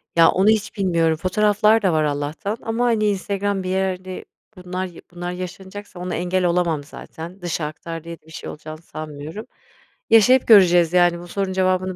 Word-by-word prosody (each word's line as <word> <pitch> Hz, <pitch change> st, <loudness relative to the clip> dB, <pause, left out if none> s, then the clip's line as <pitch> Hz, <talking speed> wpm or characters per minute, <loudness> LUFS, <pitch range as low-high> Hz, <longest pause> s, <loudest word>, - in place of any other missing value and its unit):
Ya, 165 Hz, -1 st, +7 dB
onu 195 Hz, +3 st, +3 dB
hiç 220 Hz, +1 st, 0 dB
bilmiyorum, 170 Hz, -4 st, +2 dB
fotoğraflar 210 Hz, +4 st, +3 dB
da 190 Hz, -5 st, +2 dB
var 155 Hz, -1 st, +2 dB
Allah'tan 150 Hz, +8 st, -2 dB
ama, 230 Hz, +2 st, -1 dB
hani, 225 Hz, -3 st, +2 dB
Instagram, 200 Hz, -1 st, -1 dB
bir 185 Hz, -, -4 dB
yerde, 185 Hz, -1 st, -2 dB, 0.3 s
bunlar 180 Hz, 0 st, -4 dB
ya 175 Hz, -2 st, -11 dB
bunlar 175 Hz, 0 st, -5 dB
yaşanacaksa 190 Hz, +2 st, -8 dB
ona 180 Hz, +1 st, -3 dB
engel 180 Hz, +2 st, 0 dB
olamam 170 Hz, -4 st, +1 dB
zaten. 165 Hz, +5 st, -10 dB
Dışa 170 Hz, -2 st, -2 dB
aktar 165 Hz, +2 st, -7 dB
diye 170 Hz, 0 st, -8 dB
de -, -, -34 dB
bir 160 Hz, -, -16 dB
şey -, -, -7 dB
olacağını 155 Hz, +1 st, -9 dB
sanmıyorum. 155 Hz, +5 st, -8 dB, 0.6 s
Yaşayıp 245 Hz, +4 st, +5 dB
göreceğiz, 175 Hz, -6 st, +6 dB
yani, 175 Hz, -1 st, +4 dB
bu 175 Hz, -, -10 dB
sorunun 195 Hz, +1 st, -2 dB
cevabını 185 Hz, 0 st, 0 dB
180 Hz, 175 wpm, -21 LUFS, 170-200 Hz, 0.6 s, Ya